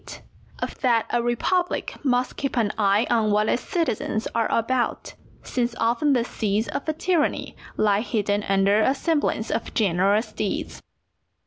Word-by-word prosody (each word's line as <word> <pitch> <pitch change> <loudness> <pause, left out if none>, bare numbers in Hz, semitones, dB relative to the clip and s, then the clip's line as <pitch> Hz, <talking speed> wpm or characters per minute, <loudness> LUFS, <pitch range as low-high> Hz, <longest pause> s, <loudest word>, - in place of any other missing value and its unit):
—_That 235 -4 +1
a 240 - +2
Republic 345 +10 -1
must 250 -2 +1
keep 275 -2 -3
an 215 -3 +2
eye 205 +1 +3
on 225 -2 +2
what 210 +1 +2
its 240 - +1
Citizens 245 - -1
are 230 -1 +1
about; 240 +2 -1 0.3
since 240 -2 -2
often 240 +6 +2
the 240 -3 +1
seeds 215 -1 -1
of 300 - -4
a - - +1
Tyranny 330 -1 0 0.2
lie 205 -1 +3
hidden 205 -3 0
under 195 +2 +3
a 265 +5 +2
semblance 295 -7 0
of - - -3
generous 200 +2 +2
deeds. - - -3
230 Hz, 145 wpm, -24 LUFS, 210-260 Hz, 0.3 s, eye